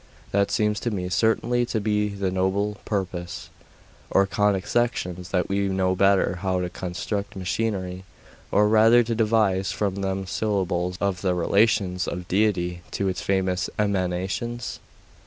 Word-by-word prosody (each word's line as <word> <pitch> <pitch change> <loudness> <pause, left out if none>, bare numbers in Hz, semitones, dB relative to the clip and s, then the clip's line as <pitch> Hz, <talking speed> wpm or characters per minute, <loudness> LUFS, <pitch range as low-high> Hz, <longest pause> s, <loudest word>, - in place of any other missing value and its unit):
'That 100 0 +2
seems 105 -1 +1
to 120 - -2
me 90 -4 -3
certainly 115 +5 +2
to 120 -2 -1
be 105 0 0
the 100 -2 -2
nobler 95 +3 0
purpose.' 95 -4 -4 0.6
'Or 100 - +4
conic 100 -1 +1
sections, 90 -7 -1
that 90 -2 0
we 100 0 0
may 95 - -1
know 95 -1 +1
better 95 -1 +3
how 95 -1 0
to 90 -1 -3
construct 100 +3 -4
machinery; 95 -1 -2 0.5
or 105 +1 +4
rather 110 +3 +6
to 115 0 -2
devise 105 -4 +2
from 100 -2 -1
them 95 0 -2
symbols 90 -3 -1
of 100 -3 -1
the 90 -2 +1
relations 95 0 +2
of 90 0 -5
Deity 90 -4 +1
to 100 -1 -1
its 90 - -3
various 95 -1 0
emanations? 100 +4 -2
95 Hz, 150 wpm, -24 LUFS, 90-105 Hz, 0.6 s, rather